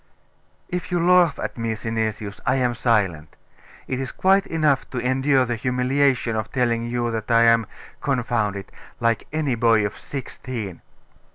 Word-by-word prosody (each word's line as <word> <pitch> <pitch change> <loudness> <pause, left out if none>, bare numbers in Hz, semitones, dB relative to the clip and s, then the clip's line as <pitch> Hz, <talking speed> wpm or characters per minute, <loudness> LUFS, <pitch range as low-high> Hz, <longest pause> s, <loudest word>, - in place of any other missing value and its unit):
'If 180 0 -4
you 175 - +1
laugh 175 -2 +4
at - - -5
me, 115 -1 -1
Synesius, 110 -2 -3
I 125 - +2
am 125 -2 +1
silent. 100 - 0 0.5
It 130 - -2
is 130 -1 -4
quite 195 +1 +3
enough 150 -4 +1
to 130 - -6
endure 130 +2 +2
the 120 0 -2
humiliation 125 0 +1
of 110 0 -3
telling 120 -3 0
you 120 0 -1
that 110 0 -4
I 115 0 +5
am 115 -2 +4 0.3
confound 120 -7 0
it! 100 0 -8 0.3
like 115 -2 0
any 150 -3 0
boy 115 -2 +3
of 105 - -4
sixteen. 120 -8 -6
120 Hz, 160 wpm, -23 LUFS, 115-135 Hz, 0.5 s, I